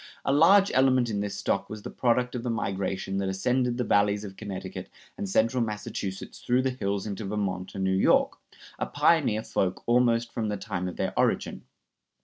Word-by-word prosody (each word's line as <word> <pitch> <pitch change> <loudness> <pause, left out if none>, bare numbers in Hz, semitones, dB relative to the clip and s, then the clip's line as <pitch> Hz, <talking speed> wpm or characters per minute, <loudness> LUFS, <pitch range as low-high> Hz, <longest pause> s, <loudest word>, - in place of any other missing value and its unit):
A 135 - +2
large 190 +7 +6
element 130 -2 +3
in 100 - -1
this 100 0 -3
stock 100 - -1
was 110 -1 -8
the - - -6
product 125 0 +1
of 125 - -3
the 120 - -3
migration 95 -3 -2
that 95 -1 -1
ascended 125 +5 0
the 125 - 0
valleys 100 -1 +2
of 95 -2 -8
Connecticut 100 -3 -7 0.3
and 100 - -4
central 115 +5 +2
Massachusetts 105 -3 -5
through 125 +1 +1
the 130 - +1
hills 100 -5 -2
into 105 0 -5
Vermont 95 -2 -3
and 95 - -2
New 95 0 +1
York, 95 - +3 0.4
a - - -1
pioneer 135 -10 +2
folk 95 -1 -1
almost 120 -1 +2
from 110 -3 -2
the 105 - -2
time 95 -3 -4
of 90 - -6
their - - -1
origin. - - 0
105 Hz, 190 wpm, -27 LUFS, 95-125 Hz, 0.4 s, large